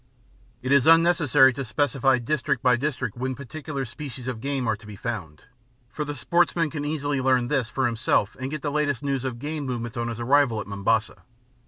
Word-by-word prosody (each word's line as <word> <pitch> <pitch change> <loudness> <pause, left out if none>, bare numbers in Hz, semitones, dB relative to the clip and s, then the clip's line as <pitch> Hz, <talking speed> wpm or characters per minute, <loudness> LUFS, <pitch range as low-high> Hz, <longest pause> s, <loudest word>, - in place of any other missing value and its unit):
It 130 - -2
is 140 -1 +5
unnecessary 160 -5 +5
to 135 - -4
specify 135 0 +2
district 130 +1 -1
by 125 -1 +5
district 140 +1 -2
when 130 +1 -3
particular 140 +1 -5
species 130 0 -8
of 120 -4 -4
game 135 -2 -2
are 110 - +2
to 105 0 -15
be 105 - -8
found, 100 -10 -6 0.5
for 150 - -3
the 145 0 -5
sportsman 165 +4 +1
can 150 -2 -4
easily 145 -2 -1
learn 130 -2 +2
this 135 -6 0
for 130 0 -1
himself 115 -3 +1
and 130 +1 -3
get 155 0 -5
the 145 - -1
latest 145 -2 0
news 135 -2 -1
of 130 -3 -3
game 150 +4 -4
movements 120 -3 -4
on 120 0 -1
his 120 -1 -5
arrival 125 -2 +3
at 100 - -5
Mombasa. 100 +3 0
130 Hz, 200 wpm, -25 LUFS, 120-145 Hz, 0.5 s, is